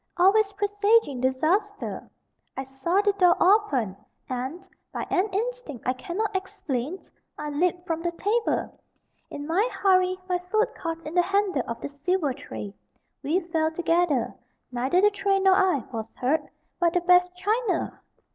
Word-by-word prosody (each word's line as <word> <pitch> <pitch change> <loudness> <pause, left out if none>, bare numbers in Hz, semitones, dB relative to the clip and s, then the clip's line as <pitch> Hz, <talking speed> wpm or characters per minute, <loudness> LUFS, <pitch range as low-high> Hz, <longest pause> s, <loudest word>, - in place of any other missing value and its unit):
always 400 +3 +4
presaging 410 - +2
disaster. 345 +11 0 0.5
I 265 - -2
saw 270 +9 0
the 410 -1 +2
door 360 -3 +4
open, 345 - +3 0.3
and, 265 +9 -5 0.2
by - - -4
an 385 +4 +2
instinct 475 - -3
I 255 - +3
cannot 390 +10 -3
explain, 330 -5 -3 0.4
I 300 0 -4
leaped 350 +4 0
from 330 -3 -2
the 345 0 -1
table. 435 +6 -1 0.5
In 285 - -6
my 380 +10 +1
hurry, 370 -1 +3
my 360 -1 0
foot 430 +6 0
caught 330 -2 -5
in 305 - -6
the 355 - +5
handle 385 -4 +1
of 230 - -4
the - - -3
silver 290 +1 -1
tray. 105 - -8 0.5
We 315 +7 +1
fell 325 -2 0
together 330 -6 +1 0.4
neither 260 +9 +1
the 415 +1 +5
tray 395 -1 +1
nor 385 0 +5
I 375 - +3
was 225 -1 -4
hurt 290 +4 0 0.3
but 340 -1 +2
the 355 - +2
best 360 0 +4
china!!! 415 +3 -1
360 Hz, 155 wpm, -26 LUFS, 290-395 Hz, 0.5 s, the